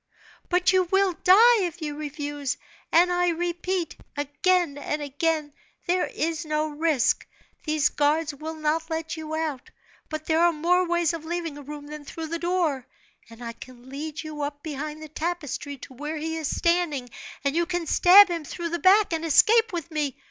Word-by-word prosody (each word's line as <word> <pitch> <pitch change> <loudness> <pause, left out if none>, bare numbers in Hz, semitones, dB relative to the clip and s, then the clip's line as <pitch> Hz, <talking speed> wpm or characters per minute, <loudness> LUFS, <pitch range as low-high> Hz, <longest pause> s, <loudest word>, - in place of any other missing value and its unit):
"But 360 +1 +3
you 370 -1 +4
will 385 +1 +2
die 450 +5 +7
if 355 -1 -3
you 300 -3 -4
refuse; 290 -2 -4 0.3
and 350 +2 +5
I 355 0 +2
repeat, 345 0 -2 0.2
again 290 +2 +1
and 300 +1 -3
again, 295 +1 -1 0.3
there 360 0 +1
is 325 +1 -2
no 305 0 -1
risk. 300 -4 +1 0.4
These 305 -1 +2
guards 300 +1 +1
will 315 +3 -6
not 315 +1 -1
let 320 0 -3
you 315 -1 -5
out; 310 -5 -3 0.4
but 310 0 -5
there 320 0 +2
are 345 0 +5
more 355 +4 +2
ways 345 -1 +1
of 330 -2 -5
leaving 335 -2 -4
a 290 - -9
room 290 +1 -8
than 300 0 -8
through 320 +2 -7
the 335 +1 -3
door, 335 -7 0 0.4
and 230 +1 -12
I 230 0 -5
can 250 +1 -13
lead 300 +3 -6
you 305 -1 -6
up 290 0 -4
behind 305 0 -5
the - - -7
tapestry 305 -3 -4
to 260 - -11
where 295 +5 -5
he 320 +1 -3
is 320 -2 -2
standing, 335 -7 0 0.4
and 280 +1 0
you 340 0 +1
can 350 -1 -2
stab 380 +5 +7
him 340 -3 -3
through 335 +3 -5
the 345 +1 -2
back, 385 +1 +5
and 325 0 -2
escape 450 - +5
with 340 -2 -5
me! 295 -4 -2
315 Hz, 185 wpm, -25 LUFS, 295-345 Hz, 0.4 s, die